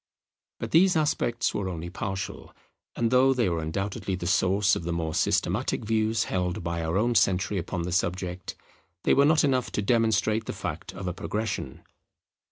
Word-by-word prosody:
But - - -5
these 180 +3 +5
aspects 120 -6 0
were 100 -2 -2
only 85 -1 -6
partial: 95 0 -5 0.4
and 115 -1 0
though 130 +1 +5
they 120 -7 +2
were 85 -1 -1
undoubtedly 95 +4 -3
the 90 - -6
source 95 +2 +3
of - - -4
the 85 - -3
more 80 -2 -2
systematic - - 0
views 110 0 +1
held 90 -1 -2
by 85 0 -2
our 80 +3 0
own 120 +4 +2
century 95 -2 +2
upon 85 +1 -3
the 90 - -3
subject, 90 0 -2 0.5
they - - +4
were 140 - +5
not 155 +1 +4
enough 130 -3 +1
to - - 0
demonstrate 110 -1 +2
the - - -3
fact - - -5
of 95 -1 -7
a 90 - -1
progression. 95 -7 -4
95 Hz, 175 wpm, -27 LUFS, 90-115 Hz, 0.5 s, these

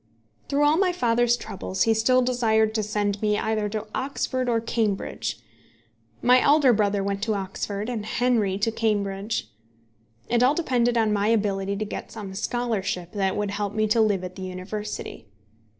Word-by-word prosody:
Through 285 +1 +2
all 295 +2 +4
my 375 -1 +3
father's 240 -7 +2
troubles 190 -3 -3
he 225 - +3
still 255 +3 +3
desired 220 -3 +2
to 220 - 0
send 205 -1 -1
me 210 -1 +2
either 215 -1 -1
to 215 0 -4
Oxford 260 -1 -2
or 230 -1 +2
Cambridge. 225 -3 -2 0.8
My 250 +1 +6
elder 285 -3 +5
brother 205 -2 +1
went 200 0 -2
to 220 0 0
Oxford, 200 +2 -4
and 225 -4 -4
Henry 225 -6 +1
to 215 +3 0
Cambridge. 205 - -1 0.8
It 240 0 +2
all 260 +4 +4
depended 245 -7 +1
on 220 -2 +2
my 205 0 +1
ability 200 -3 +1
to 215 +2 -3
get - - -7
some 205 -4 -7
scholarship 195 -5 -2
that 195 -2 -1
would 205 -1 -1
help 205 0 -3
me 215 0 +2
to 225 +1 +4
live 205 -4 +2
at 180 0 -7
the 190 - -9
University. 185 - -6
215 Hz, 170 wpm, -25 LUFS, 200-240 Hz, 0.8 s, My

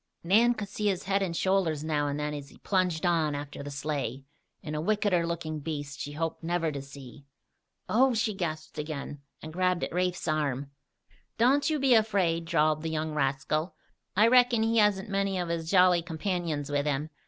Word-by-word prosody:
Nan 225 +7 +4
could 210 -3 -5
see 210 +1 -2
his 195 -2 0
head 195 0 +1
and 170 -4 -2
shoulders 185 -6 +1
now 150 -2 0
and 145 +1 -2
then 150 0 -2
as 145 -1 -7
he - - -17
plunged 180 -4 0
on 160 -4 +2
after 145 0 -6
the 145 - -6
sleigh, 140 -3 -3 0.4
and 155 -3 -5
a 150 - -1
wickeder 190 -2 +1
looking 160 -2 -3
beast, 145 -2 -5
she 145 - -5
hoped 165 +2 -3
never 165 -1 0
to 140 -2 -5
see. 140 0 -12 0.6
"Oh!" 255 +2 +3
she 220 -1 0
gasped 155 -4 -4
again, 145 -1 -5 0.2
and 155 0 -8
grabbed 180 0 +1
at - - -3
Rafe's 180 0 -1
arm. 145 -3 -1 0.7
"Don't 270 +7 +3
you 310 - +1
be 270 -2 +3
afraid," 190 -7 +2
drawled 155 -2 +2
that 160 - -3
young 155 0 -2
rascal. 150 +3 -1 0.4
"I 210 +3 +5
reckon 245 -2 +5
he 225 +1 +1
hasn't 210 -1 +2
many 195 -1 0
of 175 -2 -2
his 165 -1 -3
jolly 180 -2 +5
companions 165 -3 -3
with 145 0 0
him. 150 +2 -1
165 Hz, 190 wpm, -28 LUFS, 150-195 Hz, 0.7 s, I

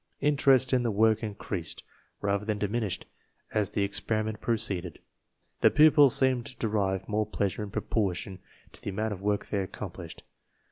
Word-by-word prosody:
Interest 135 -3 +3
in 125 - +4
the 120 - 0
work 110 +1 +3
increased, 100 -6 -5 0.4
rather 100 0 0
than 105 -1 -1
diminished, 105 -1 -2 0.5
as 105 -2 +1
the 100 - -1
experiment 110 +1 -1
proceeded. 100 -7 -1 0.6
The - - +6
pupils 150 -3 +6
seemed 130 -1 +3
to 130 - -8
derive 100 -4 -1
more 105 0 0
pleasure 100 -1 -2
in 105 - -5
proportion 95 -2 -2 0.3
to - - -15
the - - -4
amount 105 +2 -2
of 95 - -9
work 105 0 0
they 100 - -2
accomplished. 95 - -8
105 Hz, 155 wpm, -28 LUFS, 100-120 Hz, 0.6 s, The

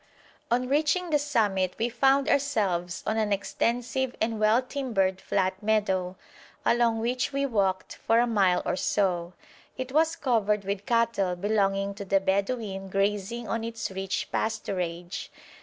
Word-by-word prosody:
On 250 +2 +1
reaching 315 +5 +1
the 295 - +4
summit 205 -10 +1
we 230 - +1
found 270 +3 +3
ourselves 195 -11 0
on 220 - 0
an 215 -2 0
extensive 235 +6 -1
and 225 -1 -1
well 215 +2 +4
timbered 230 -9 -1
flat 185 0 -1
meadow, 190 -4 0 0.5
along 235 -1 +3
which 245 +4 -1
we 275 0 0
walked 195 -7 -1
for 225 - +2
a 240 - +4
mile 195 -6 +2
or - - 0
so. 180 -3 0 0.4
It 260 0 -4
was 320 +3 +3
covered 215 -8 +1
with 200 +1 -3
cattle 230 -6 +1
belonging 195 0 0
to 200 0 -7
the 195 0 +2
Bedouin 195 0 -1
grazing 205 +4 -1
on 230 0 -2
its 230 -3 -4
rich 190 0 -3
pasturage. 180 -5 -3
215 Hz, 145 wpm, -27 LUFS, 195-240 Hz, 0.5 s, the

